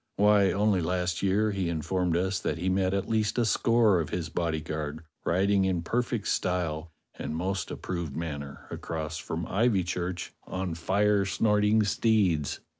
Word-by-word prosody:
Why, 105 -1 +5
only 100 -2 +2
last 90 +1 -1
year 100 +3 +2
he 95 -3 -1
in 80 -2 -2
formed 90 -3 0
us 95 +2 0
that - - -2
he 90 +3 -1
met 95 0 +1
at 100 0 -1
least 110 -1 0
a 120 - +3
score 110 -3 +3
of 80 - -2
his 85 -3 -3
bodyguard 80 -2 -3 0.2
riding 95 +2 +3
in 90 -3 0
perfect 120 +2 -1
style 85 -3 -1 0.3
and 75 - -3
most 95 +3 -2
approved 85 -6 -4
manner 70 -4 -5
across 80 -1 -4
from 80 +1 -4
Ivychurch 90 -4 0 0.2
on 95 -2 -3
fire 100 +4 +2
snorting 105 +2 +3
steeds. 100 -8 +1
95 Hz, 155 wpm, -28 LUFS, 85-105 Hz, 0.3 s, Why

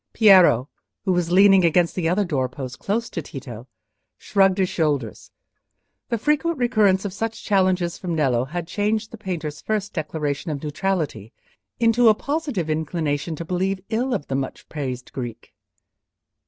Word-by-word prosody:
Piero, 185 - +6 0.4
who 190 - +2
was 175 -1 0
leaning 195 0 +6
against 170 0 +3
the 165 -3 0
other 200 +4 +1
doorpost, 130 -4 -3
close 230 +4 -1
to - - -3
Tito, - - -9 0.5
shrugged 195 -2 +2
his 190 -1 +2
shoulders: 150 - -2 0.8
the 235 - 0
frequent 300 +6 0
recurrence 215 -6 +2
of 195 - -3
such 225 +3 -4
challenges 185 -3 +1
from 175 -3 -3
Nello 130 -5 +1
had 170 +4 -4
changed 210 +4 -1
the 230 - -9
painter's 165 -7 -5
first 210 -2 -2
declaration 155 -1 -3
of 145 -1 -4
neutrality 150 - -2 0.5
into 230 0 +5
a 215 - +5
positive 280 - -2
inclination 155 -1 -2
to 170 - -6
believe 185 +3 -1
ill 245 +4 0
of 145 - -4
the - - -5
much 135 0 -4
praised 130 -4 -5
Greek. 120 -4 -7
180 Hz, 155 wpm, -23 LUFS, 150-210 Hz, 0.8 s, Piero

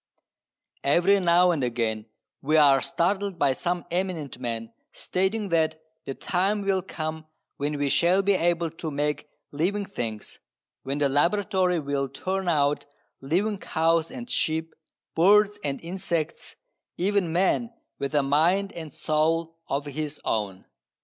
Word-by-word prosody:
Every 175 +8 +4
now 175 0 +4
and 155 -6 -1
again 115 -3 -1 0.3
we 155 +3 +2
are 140 -3 +6
startled 195 +2 0
by 140 -4 +3
some 175 +4 -2
eminent 175 -8 -2
man 115 -2 -4 0.2
stating 195 +3 -1
that 160 -2 +1 0.3
the 135 - -4
time 195 +3 0
will 195 -1 +1
come 155 -2 -5 0.3
when 145 +1 -2
we 145 0 0
shall 180 +6 +3
be 200 +1 +3
able 170 -2 +1
to 165 -1 -5
make 150 0 -2 0.2
living 190 +8 -1
things, 115 - -6 0.4
when 135 +1 -3
the 145 -1 +2
laboratory 180 +4 +2
will 140 -2 -2
turn 190 +4 -3
out 145 -3 +1 0.3
living 190 +9 0
cows 165 -1 +1
and 245 -2 -7
sheep, 160 -6 -1 0.4
birds 205 +4 +5
and 140 -1 -2
insects, 170 -3 -3 0.4
even 190 -2 +1
man 195 +7 +1 0.3
with 140 +2 -3
a 145 - +4
mind 170 +8 +2
and 160 -4 -8
soul 165 +1 0
of 140 +1 -2
his 150 +1 -5
own. 100 -4 -2
165 Hz, 140 wpm, -26 LUFS, 145-185 Hz, 0.4 s, are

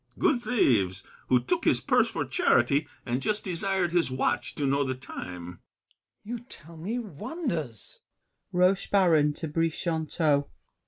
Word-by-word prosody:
— - - -33
Good 250 -5 +2
thieves, 100 - +2 0.2
who 125 - +4
took 120 - -1
his - - +3
purse - - +3
for - - -2
charity, 145 +2 +2 0.2
And 125 +1 -1
just 210 +9 -1
desired 185 0 0
his 175 -3 +2
watch 130 0 -1
to 145 - -1
know 140 +1 +2
the 130 -1 -2
time. 90 -8 -8
GASSÉ. - - -42 0.3
You 240 +1 -4
tell 170 - -12
me 190 +9 -3
wonders! 180 - -4
150 Hz, 125 wpm, -28 LUFS, 125-205 Hz, 0.3 s, who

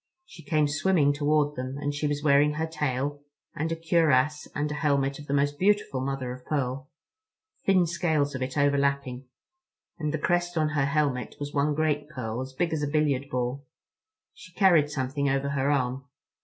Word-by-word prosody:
She 175 - -13
came 150 +1 +2
swimming 150 -1 +2
toward 150 0 +1
them, 130 +2 -5
and 145 0 -2
she 150 +1 -1
was 145 0 -2
wearing 145 0 +4
her 160 +2 -1
tail, 145 -2 -2 0.3
and 160 +2 -2
a - - 0
cuirass 155 -3 +2
and 150 +1 -1
helmet 140 -2 0
of 145 - -11
the 140 - -2
most 145 +1 0
beautiful 200 -9 +2
mother 135 -2 -3
of 125 0 -11
pearl—thin 165 - -3
scales 160 -4 0
of 130 - -5
it 130 +2 -3
overlapping; 140 -2 +1 0.7
and 150 -2 -1
the 155 - -1
crest 175 +2 0
on 155 -1 +2
her 145 -2 +1
helmet 140 -3 0
was 145 0 -5
one 145 +1 +1
great 150 -1 0
pearl, 125 -5 -4
as 130 0 -6
big 165 +4 -1
as 155 - -1
a 145 - 0
billiard 140 -2 0
ball. 125 +2 -3 0.7
She 485 - -14
carried 170 -7 +4
something 140 0 -1
over 135 +1 0
her 140 0 0
arm. 135 -1 0
145 Hz, 180 wpm, -27 LUFS, 135-155 Hz, 0.7 s, wearing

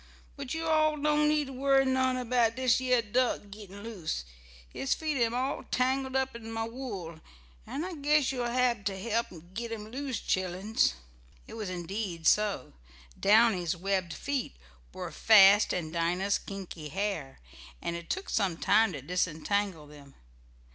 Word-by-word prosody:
But 280 0 -5
yo' 325 0 -3
all 310 -1 +3
don't 300 +1 +3
need 300 -1 +2
to 270 - -8
worry 270 +1 +3
none 260 -1 +2
about 240 -2 +1
dish 255 -2 +3
yeah 250 -2 +2
duck 240 +3 0
gittin 200 -1 -10
loose. 180 - -4 0.4
His 130 - -1
feet 310 -2 -2
am 235 -1 +1
all 260 +3 -1
tangled 260 +1 0
up 265 -2 0
in 225 -1 -8
mah 225 0 -2
wool, 210 -10 -6 0.5
an' 295 - -3
I 370 - -5
guess 295 -2 +2
you'l 245 -2 -2
hab 240 -3 +1
t' 195 -1 -2
help 230 +3 -1 0.3
git 235 +3 -4
'em 215 -1 -6
loose, 265 -2 -3
chilluns!" 185 - 0 0.5
It - - -12
was 215 -4 -5
indeed 180 -1 -4
so. 205 - +2 0.5
Downy's 200 -5 +4
webbed 185 -2 -1
feet 280 - -3 0.4
were - - -6
fast 205 -1 +6
in 160 -3 -3
Dinah's 175 +4 0
kinky 180 -6 -8
hair, 190 -7 -3 0.4
and 170 - -3
it 170 0 -8
took 390 +1 -2
some 190 -6 0
time 220 +1 +3
to 140 -4 -7
disentangle 180 +1 -1
them. 145 -2 -15
220 Hz, 160 wpm, -29 LUFS, 185-260 Hz, 0.5 s, fast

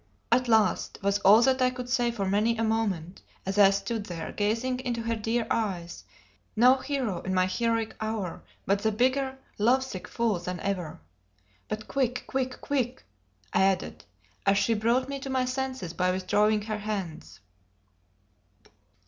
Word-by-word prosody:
"At 250 +1 +3
last!" 220 -2 +2
was 200 0 +2
all 210 +5 +7
that 260 0 +3
I 255 - +5
could 250 -1 -6
say 245 -1 +1
for 225 -4 -2
many 215 +4 +2
a 225 - 0
moment, 200 -6 -1 0.2
as 195 +2 -1
I 200 -1 +8
stood 205 +2 -2
there 165 -4 -5
gazing 230 +5 -1
into 240 -3 -3
her 230 0 -1
dear 225 +2 -1
eyes, 180 -6 -2 0.5
no 250 +4 +6
hero 260 -9 -2
in 185 0 -2
my 185 0 +4
heroic 230 +3 -1
hour, 215 -5 -3 0.2
but 200 +1 +2
the 220 - +1
bigger 260 +4 +1 0.2
love 250 +5 +4
sick 195 -8 -7
fool 230 -6 0
than 180 0 -5
ever. 185 -5 -3 0.7
"But 215 0 -5
quick 250 -3 -1
quick 260 -1 -3
quick!" 260 -3 -2 0.5
I - - +3
added, 190 -1 0 0.4
as 195 0 +3
she 230 - +2
brought 235 +4 +1
me 280 0 -4
to 270 - -6
my 260 -1 +1
senses 255 -8 -3
by 180 0 +1
withdrawing 210 +3 +2
her 215 0 -3
hands. 200 -6 -5
225 Hz, 165 wpm, -28 LUFS, 195-250 Hz, 0.7 s, I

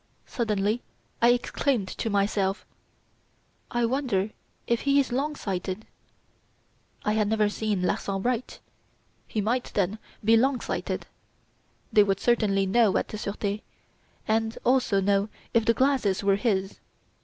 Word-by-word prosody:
Suddenly 215 -1 0 0.4
I 235 - +6
exclaimed 245 -2 +1
to 225 - -3
myself: 200 -1 0 1.0
'I 240 0 +1
wonder 230 -6 0 0.3
if 235 -1 +1
he 280 0 +3
is 265 -2 0
long 285 +5 -1
sighted?' 190 -1 -4 1.2
I 210 - +2
had 215 -1 +2
never 215 -1 +2
seen 210 -3 -1
Larsan 195 +1 -1
write. 245 0 -2 0.7
He 215 - -1
might, 240 +4 0
then, 200 +2 0 0.3
be 225 +1 +6
long 255 +3 +3
sighted. - - -3 0.9
They 210 - +7
would 195 -1 +2
certainly 205 -5 +2
know 210 +1 +3
at - - -2
the 215 - -5
Surete, 205 +1 -3 0.7
and 225 +1 0
also 245 -6 +3
know 200 +1 +2 0.2
if 230 -1 +3
the 230 - +4
glasses 260 -8 +2
were 200 -1 +4
his. 195 -3 -1
215 Hz, 135 wpm, -27 LUFS, 200-240 Hz, 1.2 s, They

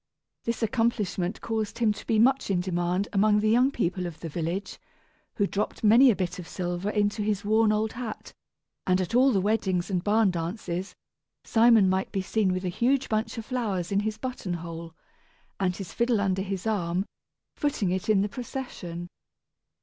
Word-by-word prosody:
This 230 0 -2
accomplishment 220 -5 0
caused 220 -2 -3
him 225 -3 +2
to - - -11
be 225 - +2
much 265 +3 +3
in 190 -2 +2
demand 180 +1 -1
among 210 +1 +4
the 215 +1 +2
young 250 +4 +4
people 185 -8 -1
of 165 -2 -9
the 165 - -6
village, 170 +5 -4 0.6
who 205 - +2
dropped 205 +3 -3
many 235 +5 +7
a 225 - +4
bit 180 -1 -3
of 175 - -8
silver 180 +2 -3
into 210 0 0
his 205 -1 -1
worn 220 +1 +4
old 215 +1 0
hat; 230 -3 -7 0.5
and 185 0 +3
at 185 +4 -2
all 260 +3 +5
the 200 - +2
weddings 190 -2 0
and 180 -2 0
barn 210 -1 +3
dances, 175 +2 -4 0.5
Simon 225 -3 +5
might 190 +1 0
be 195 - -1
seen 200 0 +1
with 185 +1 -2
a - - 0
huge 255 +8 +1
bunch 220 +1 -1
of 225 - -5
flowers 210 -9 -2
in 200 - +2
his 215 +1 -2
buttonhole, 170 -9 -5 0.6
and 185 -2 +1
his 195 -4 -7
fiddle 235 -2 +1
under 190 -1 0
his 195 0 -4
arm, 185 -3 0 0.5
footing 245 -11 0
it 185 +3 -2
in 205 -3 +4
the - - 0
procession. 200 -8 -6
205 Hz, 180 wpm, -27 LUFS, 180-225 Hz, 0.6 s, many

